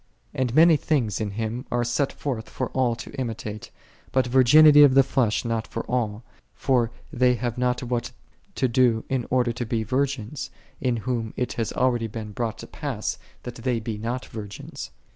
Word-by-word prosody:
And 130 -2 -1
many 165 0 +7
things 120 - 0
in 105 - -1
Him 110 +4 -4
are 120 0 +1
set 125 +4 0
forth 120 -6 -4
for 130 - -4
all 125 -3 +1
to - - -9
imitate: 110 -4 -5 0.4
but 130 -1 +2
virginity 145 +4 +7
of 140 -3 +7
the 135 - +7
flesh 120 -5 0
not 115 -1 -1
for - - -4
all; 115 -3 -2 0.3
for 125 -4 +1 0.2
they 125 0 +3
have 120 0 -3
not 125 0 0
what 120 0 -2 0.5
to 130 - +1
do 120 -2 +2
in 130 -3 -1
order 125 -1 +2
to 120 - -4
be 115 -1 -1
virgins, 130 +1 -2 0.3
in 125 -4 0
whom 115 -3 -2
it 125 - -1
hath 115 -2 -2
been - - -5
already 120 -3 +2
brought 110 +1 -4
to - - -8
pass 135 -8 -4 0.2
that 125 - -6
they 120 0 -1
be 110 -2 -5
not 120 +4 -3
virgins. 105 - -8
120 Hz, 180 wpm, -25 LUFS, 115-130 Hz, 0.5 s, many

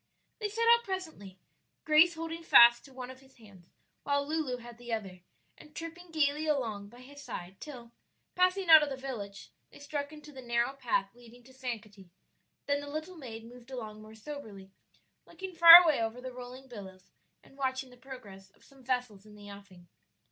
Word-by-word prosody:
They 420 -2 -2
set 455 +3 -1
out 470 - -5
presently, 320 - -6 0.5
Grace 315 +3 +5
holding 330 +1 -6
fast 235 -6 +7
to 275 - -16
one 255 -1 -8
of 260 - -14
his 265 0 -22
hands 200 -6 -18 0.3
while 285 0 -1
Lulu 305 -5 -2
had 240 -1 -13
the 240 -1 -9
other, 195 -5 -5 0.4
and 300 0 -17
tripping 340 +2 -8
gayly 305 -1 0
along 225 -9 -2
by 240 +3 -15
his 285 +3 -13
side 185 -8 -8
till, 245 -6 -10 0.4
passing 365 +1 +1
out 320 -1 +9
of 300 - -1
the 270 - -4
village, 215 -7 -7 0.2
they - - -16
struck 285 0 -5
into 300 -1 -12
the 265 -2 -10
narrow 235 +1 0
path 240 -7 -1
leading 240 0 -17
to 260 +2 -18
Sankaty; 215 -7 -7 0.6
then 285 0 0
the 285 - -8
little 310 +5 -6
maid 230 -7 -9
moved 245 +1 -14
along 220 -5 -7
more 215 +1 -13
soberly, 215 -6 -10 0.6
looking 380 -1 -8
far 335 +1 +11
away 310 -8 +2
over 225 +2 -3
the 255 0 -8
rolling 250 +1 -10
billows 195 -6 -12 0.3
and - - -20
watching 260 -1 -3
the - - -15
progress 220 -7 -12
of - - -26
some 270 -2 -20
vessels 245 -5 -3
in 210 - -15
the 205 -1 -12
offing. 195 -3 -14
255 Hz, 190 wpm, -30 LUFS, 220-300 Hz, 0.6 s, far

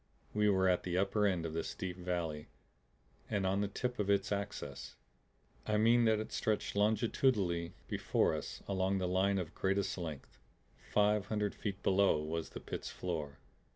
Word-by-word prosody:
We 105 0 +3
were 95 -1 +3
at 90 -1 +3
the 90 -1 -2
upper 100 +2 +2
end 90 -4 0
of 80 - -4
this 80 0 -3
deep 90 -1 -4
valley 85 -4 -3 0.8
and 100 -2 0
on 95 +1 +1
the 100 - +1
tip 125 +4 -3
of 100 -1 0
its 100 +1 +2
axis; 100 -9 -4 0.7
I 105 0 +2
mean 115 +2 +5
that 110 -1 +4
it 110 - -5
stretched 110 -2 -1
longitudinally 105 -5 +2
before - - +1
us - - -5
along 95 0 +1
the 95 -1 0
line 95 +2 +2
of 85 -4 -3
greatest 95 0 0
length. 80 -7 -7 0.5
Five 105 -1 +3
hundred 105 -1 -1
feet 100 -1 -5
below 95 -4 +4
was 80 +2 -3
the - - -7
pit's - - -5
floor. 80 -6 -4
95 Hz, 170 wpm, -34 LUFS, 90-105 Hz, 0.8 s, mean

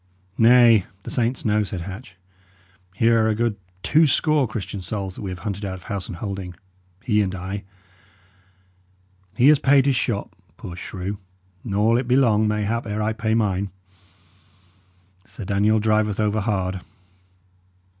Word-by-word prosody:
"Nay, 115 -3 +6 0.2
the - - -7
saints 125 +1 -1
know," 105 0 +2
said 95 -3 -4
Hatch. 95 +3 -9 0.8
"Here 115 +1 +3
are - - +2
a 110 - +1
good 115 -1 0 0.3
two 155 +10 +4
score 150 -1 +2
Christian 100 -2 -5
souls 95 +1 -4
that - - -10
we 100 - -4
have 90 - -5
hunted 100 -1 -4
out 95 -2 -3
of 90 - -12
house 100 -2 -4
and - - -6
holding, 95 -1 -6 0.5
he 105 -3 +2
and 95 -2 -2
I. 95 +2 -5 1.7
He 120 - +3
has 150 -2 +6
paid 135 -1 +4
his 140 -2 +2
shot, 115 -3 -2 0.2
poor 85 - -8
shrew, 95 +2 -6 0.4
nor 105 0 +1
will 115 - +4
it 125 - -4
be 125 - +3
long, 110 -5 +3
mayhap, 105 +2 -1
ere 105 +1 -2
I 110 +1 0
pay 110 0 -1
mine. 100 -3 0 1.5
Sir 105 - -10
Daniel 105 +2 +2
driveth 110 -1 +1
over 105 0 +1
hard." 95 -3 -2
105 Hz, 160 wpm, -22 LUFS, 95-115 Hz, 1.7 s, Nay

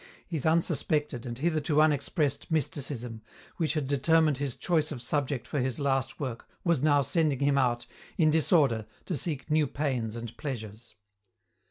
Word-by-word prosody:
His 160 -5 -2
unsuspected, 150 -5 +1
and 120 -1 -5
hitherto 155 0 +1
unexpressed, 150 -1 +1
mysticism, 130 -6 -3 0.4
which 160 -2 0
had 150 -4 -1
determined 150 +1 +3
his 140 -3 -2
choice 160 -3 0
of 140 - -4
subject 135 +1 -1
for 145 - -2
his 130 -2 -1
last 135 -2 0
work 130 -5 -5 0.2
was 170 -7 +2
now 145 -2 +4
sending 150 0 +1
him 140 +1 +2
out, 120 -3 +1 0.3
in 155 -3 +4
disorder, 145 - +3 0.2
to 180 - -2
seek 150 -1 -3
new 155 -1 +3
pains 125 -6 -2
and 115 -1 -6
pleasures. 115 -5 -6
140 Hz, 155 wpm, -29 LUFS, 125-155 Hz, 0.4 s, now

